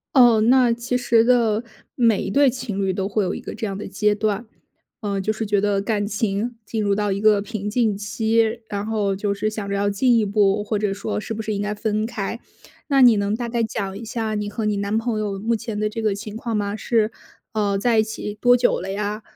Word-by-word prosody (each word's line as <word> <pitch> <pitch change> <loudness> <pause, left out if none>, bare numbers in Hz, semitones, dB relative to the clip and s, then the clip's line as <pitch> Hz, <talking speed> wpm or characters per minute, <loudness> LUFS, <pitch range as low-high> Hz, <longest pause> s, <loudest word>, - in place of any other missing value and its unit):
哦， 240 -4 +7
那 245 +1 +5
其 245 +1 -2
实 235 -2 +3
的， 230 -2 +3 0.3
每 230 -5 +3
一 - - -3
对 280 +2 +5
情 235 -6 -4
侣 195 - +1
都 190 +1 -2
会 205 0 0
有 185 - -2
一 - - -5
个 - - -7
这 220 0 -4
样 195 -1 -4
的 210 - -6
阶 210 0 +1
段。 215 +1 -1 0.6
嗯， 200 -2 -2
就 215 - 0
是 220 0 -3
觉 205 -1 +1
得 205 -1 +1
感 205 0 -1
情 215 +2 -1
进 220 0 -3
入 200 -1 +2
到 205 -1 0
一 195 - -2
个 215 -1 +5
平 210 0 -4
静 220 -2 +1
期， 220 +2 0
然 200 0 -3
后 210 -3 0
就 200 +1 -1
是 200 +1 -1
想 215 -2 -5
着 200 - -1
要 200 +1 +1
进 235 +4 +3
一 220 - +2
步， 205 0 +2
或 210 0 -1
者 205 -1 0
说 205 +2 -3
是 220 - -5
不 220 - -4
是 215 0 -3
应 200 - -2
该 205 - -2
分 215 0 -1
开。 220 0 -4 0.5
那 275 -2 +3
你 240 -3 +7
能 200 +1 0
大 240 +1 -3
概 235 0 -1
讲 200 -3 -3
一 220 - -8
下 225 -1 -3
你 210 -1 -2
和 220 +1 -3
你 210 -1 0
男 200 +2 -1
朋 225 -1 -1
友 205 -2 -2
目 225 +4 0
前 220 -1 -4
的 215 - +1
这 220 +2 -4
个 215 -2 +1
情 210 +1 -7
况 225 -1 -2
吗？ 205 0 -2
是， 220 0 +1 0.4
呃， 205 -2 +1
在 225 +2 +2
一 - - +4
起 220 -1 -5
多 245 0 +6
久 245 -6 +2
了 190 +1 -4
呀？ 210 +2 -3
215 Hz, 265 characters per minute, -22 LUFS, 205-225 Hz, 0.6 s, 哦